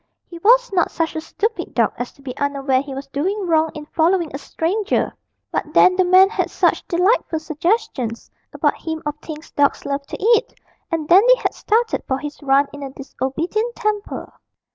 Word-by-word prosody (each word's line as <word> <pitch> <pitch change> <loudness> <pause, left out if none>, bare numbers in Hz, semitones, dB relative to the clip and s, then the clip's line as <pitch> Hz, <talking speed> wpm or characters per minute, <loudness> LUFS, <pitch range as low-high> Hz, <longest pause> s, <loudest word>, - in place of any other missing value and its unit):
He 340 - -11
was - - +4
not 355 -3 +2
such 325 -1 -2
a 315 - -2
stupid 440 +7 -3
dog - - +2
as 245 - -5
to 275 - -21
be 255 -2 -6
unaware 275 -2 0
he 275 -1 -7
was 275 +1 -6
doing 380 +9 -2
wrong 320 -2 +2
in 300 -1 -7
following 335 +1 +1
a 275 - -4
stranger, 390 +8 -1 0.4
but - - 0
then 365 - +6
the 370 - +3
man 370 +1 +6
had 440 - -2
such - - +1
delightful 360 -1 +1
suggestions 310 - -2 0.2
about - - 0
him 320 -1 -4
of 295 0 -2
things 310 0 -9
dogs 285 -1 +1
love 280 0 -3
to - - -6
eat, 460 +2 +2 0.4
and 320 -2 -2
Dandy 410 +9 +7
had - - -2
started 455 +1 0
for 265 - 0
his 290 +2 -7
run 275 0 +3
in 290 - -9
a 275 - -5
disobedient 310 - -3
temper. 425 -1 -3
325 Hz, 185 wpm, -20 LUFS, 285-405 Hz, 0.4 s, Dandy